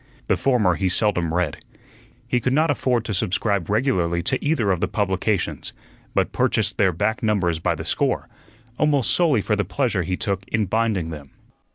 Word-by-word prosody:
The - - +2
former 120 -9 +2
he 95 +2 0
seldom 90 -4 +1
read. 85 -3 -1 0.7
He 125 - +1
could 125 +1 0
not 155 +2 +3
afford 125 -3 0
to 110 - -3
subscribe 100 0 0
regularly 95 -7 +1
to - - 0
either 145 -10 +1
of 90 - 0
the - - +1
publications, 100 -1 -1 0.4
but - - +1
purchased - - 0
their 95 -2 +4
back 110 +7 -1
numbers 95 -7 +1
by - - 0
the - - -7
score, - - 0 0.5
almost 145 -5 +2
solely 150 - +2
for 105 - +1
the 105 - 0
pleasure 120 -8 -1
he 90 +2 -2
took 100 -1 -2
in 110 -1 0
binding 105 -5 0
them. 75 -3 -9
105 Hz, 180 wpm, -22 LUFS, 90-120 Hz, 0.7 s, their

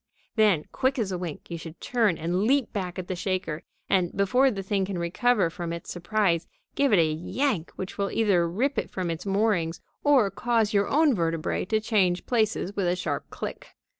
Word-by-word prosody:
Then, 210 -9 +3
quick 265 +1 0
as 215 -5 -1
a 180 - -1
wink, 170 -1 -7
you 170 - -4
should 165 0 -10
turn 225 -8 +1
and 175 +4 -1
leap 270 +1 +2
back 185 -4 -3
at 185 -1 -5
the 185 - -2
shaker, 180 -4 -2 0.3
and, 180 -3 +2
before 250 +7 +4
the 195 -5 -4
thing 195 0 0
can 190 -1 -3
recover 185 +2 +1
from 170 0 -5
its 170 0 -6
surprise, 175 -1 0 0.3
give 280 -1 +2
it 205 - +6
a 165 - +5
yank 170 - -1
which 190 +2 -6
will 200 0 +1
either 190 -7 +2
rip 260 +11 0
it - - -4
from 180 -3 -2
its 165 +4 -5
moorings 195 -5 +1 0.2
or 265 -9 +4
cause 220 +1 +1
your 200 0 +3
own 295 -2 +4
vertebræ 165 -1 -1
to 220 - +2
change 195 -5 +1
places 215 -4 0
with 195 -3 0
a 175 - +2
sharp 180 - -3
click. - - -6
195 Hz, 200 wpm, -26 LUFS, 175-220 Hz, 0.3 s, it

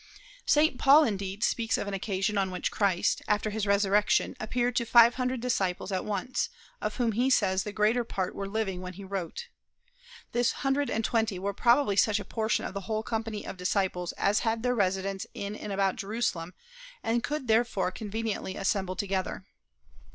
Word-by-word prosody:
St. 300 -3 +3
Paul 285 +3 +7
indeed 200 -4 -2
speaks 225 -2 +1
of - - -3
an 200 - -3
occasion 195 +1 -1
on 195 -1 +1
which 180 -1 -2
Christ, 195 -4 +1
after 210 0 +1
his 210 -1 -2
resurrection, 200 +1 +2
appeared 240 +2 -1
to 235 - +2
five 235 0 +7
hundred 255 -1 -2
disciples 195 -6 -1
at 185 -1 -1
once, 215 +4 -2 0.3
of - - -2
whom 240 -3 +1
he 245 +5 +1
says 190 -7 +3
the 210 - -5
greater 220 +3 +2
part 190 -5 -3
were 195 - -4
living 195 -3 -2
when 185 0 -6
he 200 +2 -10
wrote. 195 - -5 0.8
This 240 0 +2
hundred 275 +1 +1
and 225 0 -1
twenty 225 -4 0
were 200 +2 -2
probably 235 0 +3
such 210 +1 +3
a - - -7
portion 220 -1 -1
of - - -5
the 200 -2 -6
whole 215 0 -1
company 225 -2 -3
of - - -7
disciples 180 -1 -1
as 205 +1 +2
had 225 -1 -1
their 250 0 +2
residence 195 -2 -1
in 200 +1 -4
and 210 - -6
about 195 -1 +1
Jerusalem, 200 -5 -2 0.5
and 230 +1 0
could 295 -3 -3
therefore 220 -4 +2
conveniently 215 -1 -4
assemble 190 -1 -1
together. 190 -1 -2
210 Hz, 180 wpm, -28 LUFS, 195-230 Hz, 0.8 s, Paul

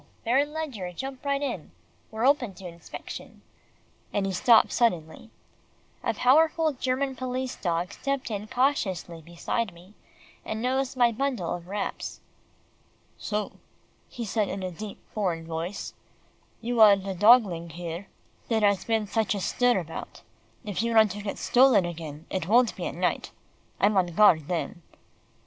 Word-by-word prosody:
Baron 275 +5 +2
Ledgar, 270 - -4
jump 265 +7 -6
right 280 0 0
in. 240 - -4 0.4
We're 220 +2 -2
open 255 -8 +2
to 190 - -12
inspection," 170 -1 -9 0.7
and 200 - 0
he 195 - -1
stopped 225 +5 +5
suddenly. 180 -4 0 0.7
A - - 0
powerful 315 +4 +4
German 265 +1 -1
police 255 0 -3
dog 175 +2 -2
stepped 275 -3 -3
in 210 0 -4
cautiously 195 - 0
beside 175 +6 -3
me, 180 +4 -16 0.5
and 220 - -4
nosed 260 +2 -1
my 240 -2 +5
bundle 245 -7 -2
of 175 0 -7
wraps. 200 +2 -4 1.0
"So," 210 -1 -3 0.5
he 235 - -6
said 210 0 0
in 195 0 -4
a 185 - -3
deep 205 +4 -8 0.2
foreign 175 -6 -1
voice, 165 +4 -5 0.7
"you 235 0 0
are 210 -2 +9
the 195 0 -5
dogling 195 -4 +5 0.8
there 225 -2 +1
has 200 -2 +3
been 225 -2 0
such 215 0 0
a - - -2
stir 245 +4 +2
about. 165 -3 -7 0.4
If 205 -1 -2
you 230 0 -1
want 220 -2 +6
to 205 +2 -6
get 205 -1 -4
stolen 250 -7 +4
again, 160 -2 -7
it 185 -3 -2
won't 235 +2 +4
be - - -4
at - - -6
night. - - -1 0.5
I'm 205 +1 +3
on 185 -2 +3
guard 170 -4 +4
then." 175 0 -3
215 Hz, 150 wpm, -27 LUFS, 180-250 Hz, 1.0 s, are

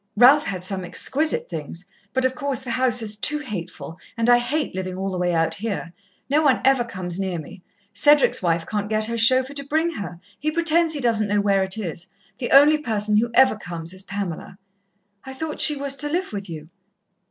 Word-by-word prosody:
Ralph 270 +6 +6
had 185 -2 -4
some 190 0 -2
exquisite 270 - 0
things 165 +2 -7 0.3
but, 260 +3 0
of 260 - +1
course, 280 -2 -3
the 245 - -5
house 245 -1 +1
is 210 -1 -1
too 300 +8 +1
hateful, 185 - -7 0.2
and 230 +1 +2
I 240 - +6
hate 280 +5 -2
living 185 0 -5
all 190 +1 -3
the 185 - -4
way 180 0 0
out 165 -1 +1
here. 200 -5 -4 0.3
No 290 +3 +2
one 280 -4 +3
ever 265 -2 +4
comes 185 -5 -5
near 190 -3 -2
me. 165 +4 -10 0.3
Cedric's 295 -1 +4
wife 170 -2 0
can't 210 +1 -3
get 215 0 +2
her 230 +1 -3
chauffeur 255 +4 +3
to 280 0 -3
bring 315 +4 0
her 180 - -7 0.2
he 305 - -1
pretends 330 0 +2
he - - -3
doesn't 225 -3 +2
know 205 0 +1
where 200 -1 +2
it 190 +2 -1
is. 175 -3 -5 0.3
The 240 - -3
only 295 +3 +6
person 210 -6 0
who 235 +2 -1
ever 260 -2 +5
comes 170 -4 -7
is 185 - -6
Pamela." 195 -2 -6 0.7
"I 265 0 -9
thought 310 +2 -3
she 300 - +7
was 280 -1 -2
to 295 +2 -2
live 350 - -2
with 200 -2 -6
you?" 160 -1 -9
220 Hz, 210 wpm, -22 LUFS, 185-275 Hz, 0.7 s, she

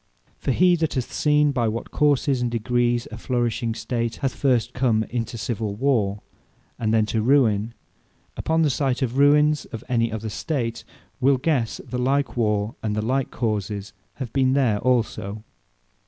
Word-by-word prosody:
For - - -4
he 180 +6 +4
that 160 -2 -1
hath 130 -2 -3
seen 150 -1 +3
by 120 -4 0
what 110 +1 -4
courses 140 -3 +2
and 120 - 0
degrees, 120 +1 0
a 115 - -7
flourishing 120 -2 -1
State 115 -1 -2
hath 135 -2 -2
first 125 -3 +1
come 120 -4 +2
into 120 0 -3
civill 110 -2 -3
warre, 105 -5 +1 0.6
and 110 -2 0
then 110 -1 +3
to 110 +1 -1
ruine; 115 -3 +2 0.6
upon 160 0 +1
the 150 - +3
sights 135 -1 0
of 120 -2 -1
the 135 - -1
ruines 150 +1 +4
of 115 - -8
any 115 -2 +1
other 110 0 -4
State, 120 -1 -3 0.4
will 135 +1 +4
guesse, 130 -5 0
the 125 0 -3
like 135 +2 0
warre, 105 -2 0
and 105 -1 -2
the 105 - -1
like 130 +2 0
courses 105 -3 -3 0.2
have 130 -5 -6
been 130 -1 +3
there 125 -7 +2
also. 110 -4 -1
120 Hz, 170 wpm, -23 LUFS, 110-135 Hz, 0.6 s, he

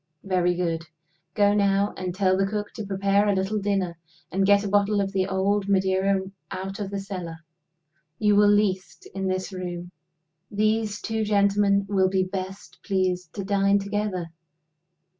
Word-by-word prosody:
Very 180 -2 +1
good. 165 -2 -2 0.5
Go 205 -1 +4
now, 200 0 +2
and 180 -1 -4
tell 190 -1 +3
the 195 +1 +1
cook 205 0 -4
to 220 - -5
prepare 200 +1 +1
a 200 - +2
little 190 +3 0
dinner; 195 -4 -1 0.3
and 195 +1 +1
get 200 0 +5
a - - -2
bottle 205 +1 +2
of 195 -1 -1
the 190 -1 0
old 195 +1 0
Madeira 190 0 +2 0.3
out 195 +2 -5
of 200 -2 -3
the 200 0 -3
cellar. 185 -5 -6 0.8
You 210 +2 +3
will 205 0 +6
least, 200 -2 0
in 195 -1 -2
this 185 +1 -2
room. 175 -1 -5 0.6
These 215 0 0
two 220 -1 -1
gentlemen 200 -1 +3
will 190 -2 +2
be 190 0 +1
best 190 +1 -6
pleased 185 -3 -1
to 200 - -3
dine 200 0 +3
together. 200 -4 -3
195 Hz, 160 wpm, -25 LUFS, 185-205 Hz, 0.8 s, will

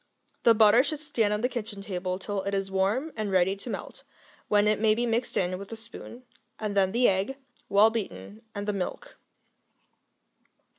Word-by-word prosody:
The 230 -1 +6
butter 220 +3 +6
should 295 +1 -3
stand 240 -9 0
on 210 0 0
the 250 - +2
kitchen 215 -5 -6
table 185 -2 -3
till 195 +1 -3
it 200 +1 -2
is 195 0 -2
warm 205 +11 0
and 215 -2 -2
ready 190 +1 +3
to 220 - -9
melt, - - -6 0.4
when 205 0 +3
it 215 0 +2
may 215 0 +4
be 240 +2 0
mixed 235 +1 -1
in 185 0 0
with 200 +2 -9
a - - -4
spoon, 230 +2 -11 0.3
and 210 -2 -3
then 190 -1 +3
the 240 +3 +3
egg, 195 +8 0 0.3
well 210 +3 +6
beaten, 205 - -5
and 205 0 -4
the 210 - +1
milk. 200 - -5
210 Hz, 190 wpm, -27 LUFS, 195-230 Hz, 0.4 s, The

